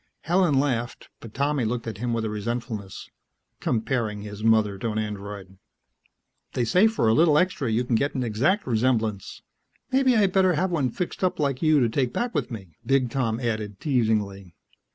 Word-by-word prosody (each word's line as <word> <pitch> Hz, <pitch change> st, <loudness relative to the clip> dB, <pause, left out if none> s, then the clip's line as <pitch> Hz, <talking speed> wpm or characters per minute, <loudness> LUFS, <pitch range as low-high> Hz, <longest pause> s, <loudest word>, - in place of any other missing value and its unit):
Helen 170 Hz, -5 st, +2 dB
laughed, 125 Hz, -4 st, -2 dB
but 115 Hz, -2 st, -12 dB
Tommy 140 Hz, -1 st, 0 dB
looked 115 Hz, +1 st, -2 dB
at 110 Hz, -3 st, -6 dB
him 120 Hz, +1 st, -2 dB
with 115 Hz, -1 st, -1 dB
a -, -, -2 dB
resentfulness. 110 Hz, -2 st, -5 dB, 0.5 s
Comparing 110 Hz, -3 st, -1 dB
his 105 Hz, 0 st, -8 dB
mother 110 Hz, -3 st, +3 dB
to 115 Hz, -, -2 dB
an 110 Hz, -, -3 dB
Android.... 100 Hz, -2 st, -6 dB, 0.9 s
"They 120 Hz, -, 0 dB
say 180 Hz, -, +4 dB
for 220 Hz, -, 0 dB
a 110 Hz, -, +4 dB
little 155 Hz, +2 st, +4 dB
extra 175 Hz, -7 st, +1 dB
you 110 Hz, +3 st, +1 dB
can 125 Hz, -, -2 dB
get 140 Hz, +6 st, +1 dB
an 130 Hz, -, -1 dB
exact 130 Hz, -, +1 dB
resemblance. 110 Hz, -4 st, -1 dB, 0.5 s
Maybe 260 Hz, -1 st, +3 dB
I'd 200 Hz, -3 st, +3 dB
better 185 Hz, -2 st, +4 dB
have 180 Hz, +4 st, 0 dB
one 145 Hz, -7 st, +1 dB
fixed 180 Hz, +8 st, -4 dB
up 185 Hz, -, +1 dB
like 140 Hz, -3 st, 0 dB
you 155 Hz, -2 st, +4 dB
to 120 Hz, -, +3 dB
take 125 Hz, +2 st, -1 dB
back 240 Hz, 0 st, -2 dB
with -, -, -1 dB
me," 95 Hz, -9 st, -9 dB
Big 135 Hz, -3 st, +1 dB
Tom 115 Hz, -4 st, -1 dB
added 110 Hz, -5 st, -3 dB
teasingly. 105 Hz, -, -1 dB
120 Hz, 185 wpm, -25 LUFS, 110-145 Hz, 0.9 s, say